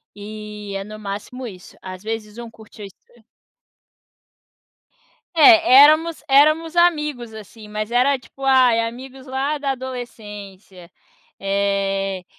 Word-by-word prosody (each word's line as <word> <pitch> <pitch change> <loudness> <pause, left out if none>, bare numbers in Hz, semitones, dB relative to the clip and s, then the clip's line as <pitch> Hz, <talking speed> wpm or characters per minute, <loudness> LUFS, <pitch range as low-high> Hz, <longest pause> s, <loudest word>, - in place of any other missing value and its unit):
e 210 0 -9
é 195 - -4
no 215 +1 -10
máximo 210 +5 -7
isso. 185 -4 -13
Às 185 -1 -9
vezes 220 -1 -6
um 235 -1 -8
curti 220 -1 -14
as 200 - -8
se 235 +4 -28 2.1
É, 325 -4 +7
éramos 315 +2 +2
éramos 310 +4 +3
amigos, 300 -9 +1
assim, 215 0 -12
mas 215 +1 -5
era 255 +3 +2
tipo, 270 +2 -17
ai 255 -3 +4
amigos 260 +3 -7
lá 270 +3 -2
da 280 -1 -3
adolescência. 210 -8 -10 0.5
Eh, 195 -1 -1
230 Hz, 120 wpm, -20 LUFS, 205-270 Hz, 2.1 s, É